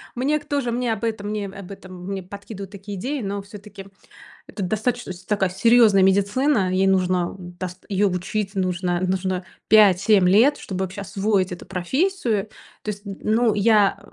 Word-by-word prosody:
мне 280 +5 +1
к 290 - -18
тоже 280 -5 -1
мне 240 -1 0
об 220 0 -7
этом 220 -3 -2
мне 210 -1 -3
об 195 -1 -10
этом 185 -2 -10
мне 195 0 -4
подкидывают 200 +1 -9
такие 200 0 -8
идеи, 270 +8 -3
но 200 -1 -3
все-таки 205 -1 -12 0.6
это 205 - -7
достаточно 220 +2 -2
с 180 +1 -14
такая 195 -2 0
серьезная 215 +1 +5
медицина, 200 +3 +2
ей 190 +1 +2
нужно 185 -2 +1
дас 180 0 -8
её 200 0 +2
учить, 190 +3 -3
нужно, 180 -2 -1
нужно 185 0 -1 0.2
5-7 200 -2 +5
лет, 235 +10 +5
чтобы 190 -1 -4
вообще 190 +2 -7
освоить 195 -1 0
эту 180 - -8
профессию. 225 - -1 0.3
То 215 - -3
есть, 205 -1 -7
ну 215 +3 0
я, 205 -1 +3
200 Hz, 165 wpm, -22 LUFS, 185-220 Hz, 0.6 s, серьезная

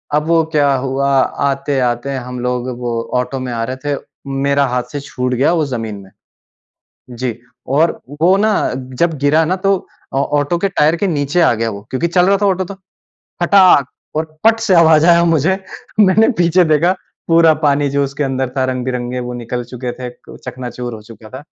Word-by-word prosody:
अब 150 +1 0
वो 165 -1 +3
क्या 145 -2 +3
हुआ 135 +1 -1 0.4
आते-आते 135 -2 -1
हम 125 -1 -6
लोग 125 0 -2
वो 120 -1 -3 0.3
ऑटो 125 +2 -5
में 130 -1 -4
आ 115 -1 -2
रहे 130 +3 -4
थे, 145 -1 0 0.3
मेरा 140 +1 +1
हाथ 125 0 -1
से 145 - -4
छूट 125 -3 -3
गया 135 +6 +2
वो 160 -3 +1
ज़मीन 115 -6 -4
में। 95 - -16 1.1
जी। 120 -2 -3 0.3
और 155 +5 +1 0.2
वो 180 +3 +5
ना 215 +1 +2 0.5
जब 170 -1 +1
गिरा 155 +3 +4
ना 180 +4 0
तो 195 0 +4 0.4
औ 135 - +1 0.2
ऑटो 145 +4 0
के 200 - 0
टायर 155 -3 +2
के 200 +4 -1
नीचे 150 0 0
आ 165 - +4
गया 115 0 -1
वो 100 -2 -7
क्योंकि 130 +6 -1
चल 180 +1 +3
रहा 200 0 +4
था - - +3
ऑटो 190 -1 +1
तो, 200 - -8 0.7
फटाक 180 -6 +5 0.3
और 155 - +1 0.2
पट 225 0 +4
से 220 -4 +2
आवाज़ 160 -2 +5
आया 170 0 +5
मुझे। 165 +3 +2 0.4
मैंने 210 +3 +5
पीछे 175 +1 +4
देखा 160 +3 +3 0.4
पूरा 165 -1 +5
पानी 145 0 +2
जो 140 +1 +1
उसके 140 +2 -3
अंदर 135 -1 -1
था 130 - +1
रंग-बिरंगे 125 -1 -3
वो 125 0 -5
निकल 120 0 -4
चुके 125 0 -6
थे, 125 0 -7
क 125 - -15
चकनाचूर 125 -1 -6
हो 110 - -10
चुका 110 0 -14
था। - - -12
140 Hz, 195 wpm, -16 LUFS, 125-170 Hz, 1.1 s, वो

